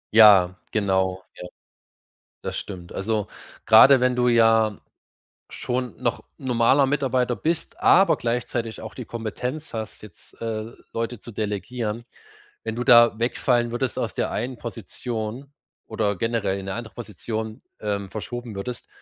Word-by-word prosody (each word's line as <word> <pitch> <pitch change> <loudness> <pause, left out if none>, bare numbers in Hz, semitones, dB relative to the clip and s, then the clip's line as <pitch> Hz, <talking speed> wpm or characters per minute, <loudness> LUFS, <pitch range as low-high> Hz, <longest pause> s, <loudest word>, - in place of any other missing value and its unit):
Ja, 100 -5 +8 0.2
genau, 95 -3 0
ja. 90 - -8 0.9
Das - - -5
stimmt, 90 -3 -7
also 105 +1 -1 0.4
grade 125 +5 +8
wenn 125 0 +2
du 125 0 +2
ja 115 -3 +4 0.7
schon 125 -6 -3
noch - - -1
normaler 130 +2 +3
Mitarbeiter 130 -3 +1
bist, 165 +4 -2
aber 195 +2 +6
gleichzeitig 115 -1 -2
auch 110 - -8
die 125 - -7
Kompetenz 125 +7 -5
hast, 110 -2 -6
jetzt, 100 -5 -16
äh, 110 0 -3 0.2
Leute 115 0 -3
zu 120 - -11
delegieren. 110 +2 -3 0.6
Wenn 110 0 -4
du 120 - -2
da 120 -2 +7
wegfallen 120 0 +1
würdest, 120 0 -2
aus - - -2
der - - -1
einen 120 +4 -3
Position 120 +3 -6 0.4
oder 105 -2 0
generell 110 -3 -1
in 95 - -8
'ne 95 - -3
andere 115 -1 -7
Position, 110 +1 -5 0.2
ähm, 100 -2 -3
verschoben 120 +1 -6
würdest, 120 +5 -5
115 Hz, 140 wpm, -24 LUFS, 105-125 Hz, 0.9 s, Ja